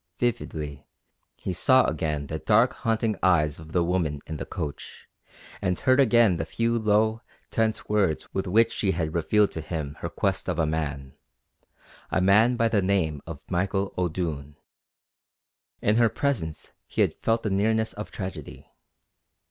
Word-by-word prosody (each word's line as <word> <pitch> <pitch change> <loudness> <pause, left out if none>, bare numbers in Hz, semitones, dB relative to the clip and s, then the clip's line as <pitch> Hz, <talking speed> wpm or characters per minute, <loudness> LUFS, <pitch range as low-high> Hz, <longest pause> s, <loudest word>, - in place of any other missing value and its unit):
Vividly 80 - -3 0.5
he 95 - -4
saw 130 +8 +4
again 75 -2 -2
the 80 +2 -5
dark, 115 +7 +3
haunting 110 -1 0
eyes 75 -6 +2
of 80 -1 -12
the 90 0 +2
woman 85 -4 0
in 80 - -5
the - - -6
coach, 75 -2 -6 0.5
and 90 -1 0
heard 130 +1 +3
again 120 -8 +5
the - - -2
few 115 0 0
low, 110 +1 +2 0.3
tense 110 -1 0
words 100 -7 +1
with 95 0 -2
which 115 +5 +4
she 95 -2 0
had 80 -3 -2
revealed 105 +5 +2
to 80 - -5
him 75 -3 -5
her 85 - -4
quest 95 -1 -1
of 90 - -1
a 80 - +2
man 75 -4 -3 1.0
a - - +1
man 105 +6 +4
by 115 -1 +2
the 110 -3 +2
name 90 -7 0
of 80 -3 -7
Michael 95 +2 -1
O'Doone. 80 -5 -3 1.3
In 105 +2 +3
her 120 -1 +5
presence 100 - -2 0.2
he - - -1
had - - +3
felt 115 0 +1
the 105 - -1
nearness 110 +3 +1
of 105 - -7
tragedy. 95 -2 -8
95 Hz, 160 wpm, -26 LUFS, 80-110 Hz, 1.3 s, again